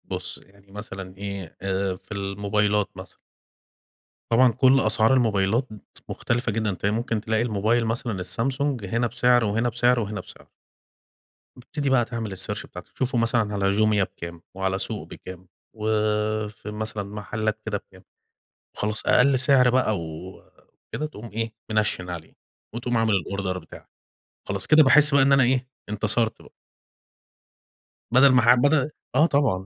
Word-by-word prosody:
بُص، - - -5
يعني 100 0 -21
مثلًا 95 -2 -8
إيه، 100 -4 -6
آآ 95 0 -1
في 90 - -20
الموبايلات 100 +1 0
مثلًا 95 0 -11 1.2
طبعًا 125 +2 +5
كل 130 +3 +4
أسعار 110 +1 +3
الموبايلات 110 0 +1
مت 105 - -14
مختلفة 120 0 -1
جدًا، 110 -1 -1
تلاقي 100 +3 -1
ممكن 115 -1 -2
تلاقي 110 +1 0
الموبايل 115 +1 +1
مثلًا 110 -4 -3
الSamsung 130 +6 -2
هنا 115 +5 0
بسِعر 125 0 +3
وهنا 115 +4 0
بسِعر 120 +1 +2
وهنا 105 -1 -4
بسِعر. - - -16 1.1
بتبتدي 140 +3 -4
بقى 125 -3 +3
تعمل 115 -4 -5
الsearch - - -4
بتاعتك، - - -12
تشوفه 130 -1 -2
مثلًا 115 -2 +1
على 100 -1 +1
Jumia 110 -2 +3
بكام، 85 -2 -8
وعلى 95 0 -1
سوق - - -4
بكام، 95 0 -11 0.3
وفي 105 -1 -1
مثلًا 110 -1 -4
محلّات 105 +1 -3
كده 110 -2 -1
بكام، 95 -1 -18 0.7
وخلاص 110 +1 -1
أقل 130 +1 +4
سِعر 130 -1 +5
بقى 120 -4 +2
وكده 85 - -9
تقوم 115 -6 -9
إيه، 115 +1 -3 0.2
مِنَشِّن 105 -4 0
عليه 85 -3 -8 0.4
وتقوم 120 0 -1
عامل 115 -1 +2
الأوردر 95 0 -2
بتاعك. 80 -3 -14 0.6
خلاص، 100 0 -2
كده 155 0 +7
باحس 150 +1 +5
بقى 140 - +6
إن 135 +1 +4
أنا 135 -1 +5
إيه، 130 +1 0 0.2
انتصرت 110 +2 0
بقى. - - -17 1.6
بدل 130 +3 +6
ما 125 - +5
ح 120 +2 +7
بدل 140 +3 +2 0.3
آه، 150 +4 +6
طبعًا 135 - +1
110 Hz, 150 wpm, -24 LUFS, 100-125 Hz, 1.6 s, كده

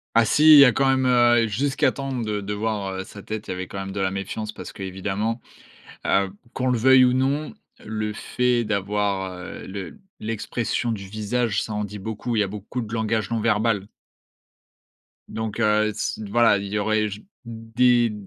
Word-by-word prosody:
Ah 115 - +6
si! 150 - +2
Il 145 - +10
y 140 - +10
a 125 - +6
quand 135 +4 +1
même, 130 -1 +2
heu, 120 -2 +4
jusqu'à 135 +6 +1
temps 135 -1 -5
de 110 -4 -2
de 105 +1 -4
voir, 105 -2 -2
heu, 95 0 -4
sa 100 +1 -12
tête. 110 -1 -6
Il - - -4
y - - -1
avait 95 0 -4
quand 100 - -7
même 95 0 -5
de 100 - -5
la 95 -1 0
méfiance 100 +3 -4
parce 105 - -9
que, 100 - -8
évidemment, 100 +5 -3 0.6
heu, 100 0 +2 0.2
qu'on 130 - -1
le 125 -1 +2
veuille 130 +2 +6
ou 125 - +3
non, 140 - 0 0.3
le 110 0 -3
fait 125 +2 0
d'avoir, 100 -2 -1
heu, 90 0 -8
le 100 - -7 0.2
l'expression 115 +2 -2
du 100 -3 -5
visage, 110 +2 -1
ça 110 - -5
en 105 0 -1
dit 105 +1 -8
beaucoup. 110 +4 -4
Il - - +2
y 105 - +4
a - - -2
beaucoup 105 +5 -5
de 110 0 -7
langage 110 -2 -1
non 115 - 0
verbal 105 -2 +1 1.4
donc, 110 0 -4
heu, 105 -1 +3
se 110 - -3
voilà, 120 -1 +4
il 100 0 -5
y 105 +2 -2
aurait, 110 +1 +1
j 100 +1 -9 0.2
des 115 +1 +2
110 Hz, 205 wpm, -23 LUFS, 100-120 Hz, 1.4 s, Il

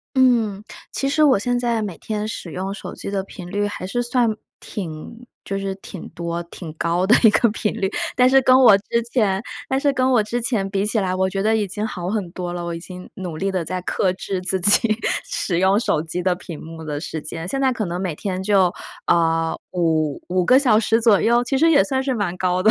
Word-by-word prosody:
嗯， 230 -6 +3 0.3
其 275 - -1
实 295 +3 +2
我 270 -7 +5
现 245 +4 0
在 235 -2 0
每 195 -5 -4
天 210 -1 -3
使 205 -5 -6
用 190 +3 -3
手 - - -8
机 - - -6
的 195 -1 -1
频 180 -2 -10
率 205 +1 0
还 205 -2 -5
是 240 +6 -1
算 240 -2 +1 0.2
挺 195 +6 -7 0.2
就 195 - -3
是 195 -1 -3
挺 190 -1 -9
多、 170 0 -4
挺 170 -1 -9
高 170 +3 0
的 215 - +6
一 225 - +8
个 235 - +3
频 210 0 -2
率。 195 - 0 0.3
但 250 0 +5
是 270 +1 +6
跟 255 0 +6
我 245 -6 +8
之 235 +3 -1
前 200 -5 +1 0.3
但 265 - +1
是 285 0 +2
跟 260 -1 +1
我 240 -4 +4
之 235 +3 -3
前 225 -4 -1
比 195 0 0
起 215 +2 0
来， 185 -3 0
我 190 0 +1
觉 195 0 -2
得 220 +2 +2
已 210 -2 0
经 210 +3 -3
好 180 -4 -5
很 200 -4 -2
多 175 -1 -4
了。 175 0 -4
我 170 0 -3
已 165 - -6
经 180 +1 -10
努 180 -5 -6
力 195 +4 -1
地 185 -3 -2
在 185 +3 -3
克 185 +1 0
制 190 0 -4
自 185 +1 -1
己 210 +3 +3 0.3
使 175 -3 -2
用 190 +2 +4
手 185 -9 0
机 165 +2 -4
的 185 0 +2
屏 170 -3 -9
幕 160 0 -9
的 150 -2 -3
时 160 -1 -5
间， 165 +2 -6
现 270 +9 -2
在 265 -1 +3
可 225 - -2
能 175 -1 -3
每 185 -4 -2
天 185 +3 -4
就， 190 -3 +3 0.3
啊， 165 -1 +2 0.2
5 160 -4 0
5 180 0 +1
个 255 +7 +6
小 240 -6 +4
时 225 +1 +2
左 220 -4 +5
右， 240 +1 +3
其 270 - -1
实 325 +4 +4
也 290 -3 +5
算 265 -2 -1
是 265 -1 -1
蛮 195 -6 -2
高 185 0 0
的。 220 - +5
195 Hz, 255 characters per minute, -21 LUFS, 180-230 Hz, 0.3 s, 一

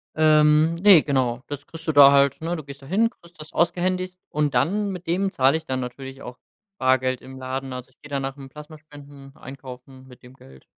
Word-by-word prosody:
Ähm, 155 0 +4
ne, 185 -2 +6
genau, 130 -4 -1
das 145 -1 -8
kriegst 165 0 -7
du - - +2
da 140 -2 +8
halt, 140 0 +3
ne? 170 +2 -2
Du 155 - -7
gehst 140 0 -11
dahin, 195 +12 +1
kriegst 170 -7 -21
das 155 +1 -11
ausgehändigt 180 +2 -1
und 150 -2 -1
dann, 200 +11 +1
mit 180 -2 -7
dem 190 +4 -1
zahle 135 -1 +2
ich 160 - -11
dann 130 -3 -3
natürlich 130 +2 -8
auch 125 0 -9 0.4
Bargeld 130 -1 +1
im 130 0 -12
Laden. 130 0 -5
Also, 125 0 -8
ich 130 - -33
gehe 145 - -13
dann 140 -1 -2
nach 135 0 -4
dem 135 -2 -12
Plasma 150 +3 -12
spenden 145 -2 -15
einkaufen 130 0 -12
mit 125 0 -17
dem 125 +1 -15
Geld. 65 - -18
140 Hz, 215 wpm, -23 LUFS, 130-160 Hz, 0.4 s, da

